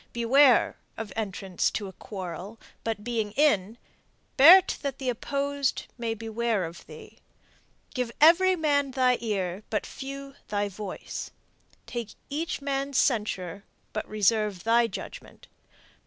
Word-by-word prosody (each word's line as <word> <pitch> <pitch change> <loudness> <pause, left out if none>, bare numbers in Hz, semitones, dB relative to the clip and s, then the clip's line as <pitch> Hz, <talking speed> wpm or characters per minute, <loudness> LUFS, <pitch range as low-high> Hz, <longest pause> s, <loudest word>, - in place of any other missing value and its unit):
Beware 250 +2 +4 0.2
Of 215 -3 -6
entrance 195 -4 -1
to 205 -1 -4
a 190 - -10
quarrel, 190 +3 -7 0.2
but, 220 -2 -3
being 220 -3 -2
in, 230 -7 +2 0.6
Bear 345 +8 +10
't - - -4
that 275 -2 -3
the 260 -2 -2
opposed 280 +2 -1
may 230 -2 -3
beware 225 -2 -1
of 165 +1 -9
thee. - - -13 0.7
Give 250 -4 -2
every 355 +4 +6
man 290 -4 +1
thy 255 -1 +2
ear, 195 -4 -2
but 215 - -1
few 275 +1 -8
thy 205 0 -1
voice; 200 0 -6 0.6
Take 235 -4 -6 0.2
each 305 -1 -3
man's 275 -1 -1
censure, 200 - 0 0.3
but 215 - -4
reserve 210 -2 +1
thy 230 +1 +4
judgment. - - -9
230 Hz, 130 wpm, -27 LUFS, 205-275 Hz, 0.7 s, Bear